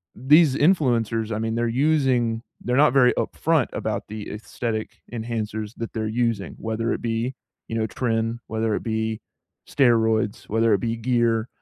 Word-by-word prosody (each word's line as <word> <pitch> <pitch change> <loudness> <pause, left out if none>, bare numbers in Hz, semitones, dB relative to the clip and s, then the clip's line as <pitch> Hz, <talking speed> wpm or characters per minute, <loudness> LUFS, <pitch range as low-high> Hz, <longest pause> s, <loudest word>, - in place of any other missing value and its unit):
these 145 +3 +5
influencers, 120 - +2
I - - -2
mean, 115 0 -2
they're 120 0 0
using 125 -3 +1 0.2
they're 125 - -1
not 145 +1 +5
very 125 -3 +5
upfront - - 0
about - - -3
the 105 0 -7
aesthetic 110 +1 -5
enhancers 110 -2 -4
that 115 - -5
they're 110 -1 -2
using, 115 -3 -1
whether 115 +1 -2
it - - -2
be, 115 +2 -2 0.3
you 115 - -2
know, 110 - +1
Trim, 115 0 -1
whether 110 0 -1
it - - -4
be 110 -1 -2 0.5
steroids, 110 -5 +2
whether 115 +1 +3
it 100 - +2
be 115 +2 -2
gear. 115 -1 +1
115 Hz, 160 wpm, -24 LUFS, 110-125 Hz, 0.5 s, these